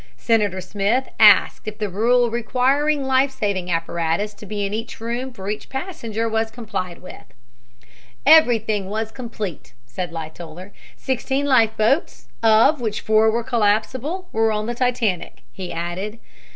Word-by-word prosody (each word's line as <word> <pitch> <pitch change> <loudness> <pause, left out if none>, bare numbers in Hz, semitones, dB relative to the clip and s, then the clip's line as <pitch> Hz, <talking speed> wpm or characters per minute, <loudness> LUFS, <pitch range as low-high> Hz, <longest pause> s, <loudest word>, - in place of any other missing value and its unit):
Senator 205 -5 +1
Smith 205 +7 -1
asked 210 0 +6
if 215 0 -5
the 210 -1 -2
rule 235 +5 +2
requiring 270 +5 +1
life 265 +1 +3
saving 200 -8 -2
apparatus 165 +4 -1
to 205 0 -13
be 205 0 -2
in 200 - -4
each 225 +4 -5
room 240 +3 -4
for 195 -5 -9
each 210 +1 -4
passenger 265 - -4
was 220 0 0
complied 205 -7 -6
with. - - -10 1.0
"Everything 230 -10 +4
was 220 +1 -3
complete," 220 - -7
said 170 +9 -5
Lightoller. 165 +3 -8 0.3
"Sixteen 265 +2 -1
life 235 -6 +3
boats, 230 +9 0
of 225 +6 +4
which 215 -3 -2
four 220 0 +4
were 230 +2 0
collapsible, 250 - 0
were 225 0 +2
on 215 0 -1
the 240 - -2
Titanic," 235 -8 -1
he 185 -2 -7
added. 175 +6 -4
220 Hz, 145 wpm, -21 LUFS, 200-245 Hz, 1.0 s, asked